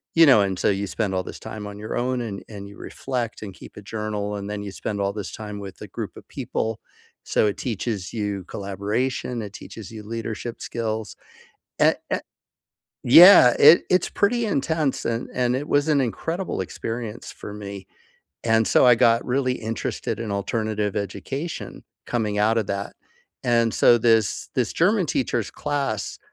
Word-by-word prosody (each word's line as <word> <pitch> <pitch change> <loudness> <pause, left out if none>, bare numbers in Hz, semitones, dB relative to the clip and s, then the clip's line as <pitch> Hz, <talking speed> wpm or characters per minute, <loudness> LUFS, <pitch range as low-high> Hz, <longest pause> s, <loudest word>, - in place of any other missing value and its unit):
you 165 - +8
know, 130 -8 +7
and 95 -2 -1
so - - +2
you 100 0 0
spend 100 -3 -2
all 95 - 0
this - - -9
time 105 -1 -7
on 105 0 -8
your 110 - -5
own, 125 +1 0
and 105 -4 -5
and 100 -2 -8
you 100 - -13
reflect 125 -4 -4
and 100 -3 -7
keep - - -14
a - - -7
journal, 105 -1 -3
and 100 0 -5
then 105 0 -4
you 100 - -6
spend 100 +1 -4
all 100 0 0
this 105 -2 -5
time 105 -1 -7
with 100 -2 -9
a - - -7
group - - -6
of - - -13
people. 110 0 -3 0.4
So, - - +2
it 100 - -2
teaches 110 -5 -3
you 105 -4 -2
collaboration, 105 +6 -2
it 105 -2 -7
teaches 110 -1 -10
you 110 -2 -8
leadership 115 +1 -5
skills. 110 -2 -3 0.7
A - - +6 0.2
a - - 0 0.8
Yeah, 130 -2 +9
it, 155 +4 +8
it's 180 -1 +2
pretty 230 +3 +1
intense, 155 -4 0
and 115 +1 -2
and 125 -1 +1
it 145 +3 -4
was 145 +2 +2
an 150 -2 +3
incredible 160 - -2
experience 115 +4 -5
for 105 - -9
me. 100 -2 -8 0.6
And, 110 -1 +3
so - - +5
I 125 - +8
got 115 +1 +4
really 130 0 0
interested 115 0 -3
in 115 -2 -4
alternative 105 +1 -1
education, 105 - -5 0.2
coming 105 -4 -1
out 110 +2 +3
of 110 - -1
that. 100 0 -3 0.5
And 115 -2 +3
so 120 - +6
this 115 -2 +2
this 125 -4 0
German 190 +2 +2
teacher's 120 -6 -1
class 140 -8 -3
110 Hz, 180 wpm, -24 LUFS, 105-125 Hz, 0.8 s, Yeah